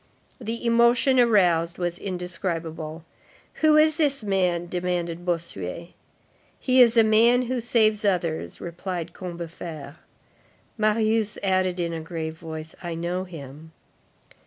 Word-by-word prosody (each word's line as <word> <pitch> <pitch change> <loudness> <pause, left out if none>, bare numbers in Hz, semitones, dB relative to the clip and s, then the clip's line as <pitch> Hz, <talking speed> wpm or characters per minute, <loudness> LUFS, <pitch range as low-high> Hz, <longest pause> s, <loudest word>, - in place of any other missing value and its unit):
The 230 0 -5
emotion 235 +3 +4
aroused 175 -8 +3
was 175 -1 -3
indescribable. 170 -4 -4 0.6
"Who 310 -1 +5
is 310 0 +4
this 280 -6 +1
man?" 180 -4 0
demanded 175 -1 -3
Bossuet. 170 - -4 0.7
"He 255 -1 +4
is 235 -1 +5
a 225 - +8
man 230 +3 +4
who 250 0 -2
saves 220 -2 +2
others," 175 -5 -1
replied 175 -1 -5
Combeferre. 170 -4 -8 0.8
Marius 215 0 +1
added 185 -2 +1
in 170 -1 -2
a 165 - -4
grave 160 -1 -5
voice: 160 -1 -7
"I 170 -2 -4
know 175 +3 -3
him." 160 -2 -11
180 Hz, 120 wpm, -24 LUFS, 170-220 Hz, 0.8 s, a